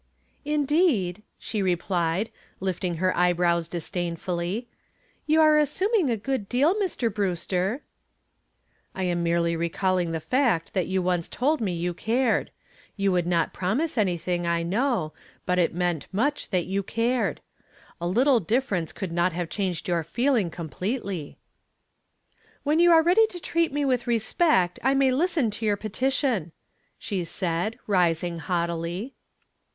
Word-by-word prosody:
"Indeed," 290 - +1 0.2
she 215 - -3
replied, 180 +1 0 0.3
lifting 180 -2 -2
her 185 +3 +1 0.2
brows 170 -1 +1
disdainfully. 175 +5 -3 0.6
"You 315 +1 +4
are 310 -1 +6
assuming 375 - +1
a 230 - +1
good 235 -2 -3
deal, 280 +8 +3
Mr. 365 - -1
Brewster." 190 - -1 1.1
"I 190 - -2
am 175 -1 0
merely 170 0 +1
recalling 175 +1 0
the 165 - -2
fact 235 - +1
that 185 -3 0
you 190 -1 0
once 175 -2 0
told 290 +3 0
me 195 -5 0
you 175 +1 -2
cared. 230 +5 +1 0.5
You 195 -1 +2
would 175 -2 +1
not 170 -2 +1
promise 260 - -1
anything, 175 -4 0
I 170 0 +1
know, 200 - 0 0.3
but 180 0 +1
it 170 - +3
meant 175 -3 -1
much 280 +10 -1
that 180 -4 0
you 195 +1 -1
cared. 230 +5 0 0.6
A 175 - -1
little 250 +7 +4
difference 195 -4 -1
could 190 -4 -5
not 175 +1 +1
have 170 -1 -3
changed 185 -3 -2
your 175 -2 +1
feeling 235 - +1
completely." 180 - -4 1.3
"When 300 +3 +2
you 345 0 +6
are 325 -1 +7
ready 390 +7 +5
to 360 -5 -8
treat 335 -1 0
me 290 0 0
with 250 -2 0
respect 230 - +2
I 270 +2 +3
may 270 -1 +4
listen 300 -4 +1
to 220 +2 -4
your 205 -1 +2
petition," 225 - -1 0.4
she 195 -5 -3
said, 175 +4 -2
rising 175 -3 +1
haughtily. 170 - -2
190 Hz, 145 wpm, -26 LUFS, 175-260 Hz, 1.3 s, are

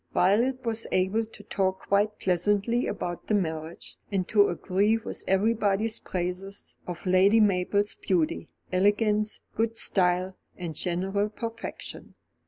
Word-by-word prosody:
Violet 240 +8 +2
was 225 0 0
able 190 +5 +1
to 215 -1 -15
talk 190 -2 -1
quite 205 +2 +2
pleasantly 205 +6 +1
about 175 -1 -4
the 215 - +2
marriage, 160 -3 -3
and 190 -2 0
to 205 -2 +5
agree 200 +5 +1
with 225 - -6
everybody's 215 +2 +1
praises 185 +2 -5
of 175 +1 -6
Lady 190 +4 +5
Mabel's 200 0 +2
beauty, 175 -5 -1 0.2
elegance, 210 +2 +2
good 225 +1 0
style, 185 -1 +1 0.2
and 175 -3 -5
general 195 +5 -1
perfection. 230 +1 -7
200 Hz, 125 wpm, -27 LUFS, 185-215 Hz, 0.2 s, to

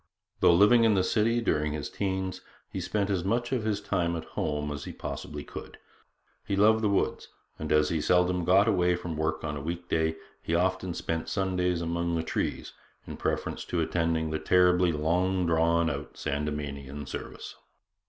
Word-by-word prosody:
Though 85 - +6
living 105 +6 +6
in 110 -2 +4
the 95 - +3
city 115 +5 +2
during 75 -8 0
his 75 -1 -4
teens, 95 -1 -3 0.3
he 95 - -4
spent 100 +3 -1
as 95 -3 0
much 120 +5 0
of 125 -4 0
his 105 -2 0
time 90 -4 -1
at 80 - -4
home 75 -1 -2
as 75 0 -5
he - - -6
possibly 75 -1 -6
could. - - -9 0.7
He 100 - -2
loved 110 +2 +5
the 105 - +2
woods, 100 - 0 0.3
and 80 - -4
as 75 0 +4
he 80 -2 0
seldom 90 +2 +2
got 95 +5 +5
away 90 -4 +3
from 85 -2 -5
work 80 0 -1
on 75 -2 -3
a 70 - -5
week 85 +3 -5
day, 80 0 +1 0.3
he 85 - -1
often 95 0 0
spent 80 0 -3
Sundays 90 -3 0
among 85 0 -1
the 80 - -1
trees 80 - -3 0.3
in - - -7
preference - - -2
to 85 - -2
attending 80 -1 0
the 80 - -1
terribly 90 +1 +4
long 90 +4 +1
drawn 85 0 +3
out 70 -3 -4
Sandemanian 70 -1 -4
service. - - -7
85 Hz, 185 wpm, -28 LUFS, 80-95 Hz, 0.7 s, Though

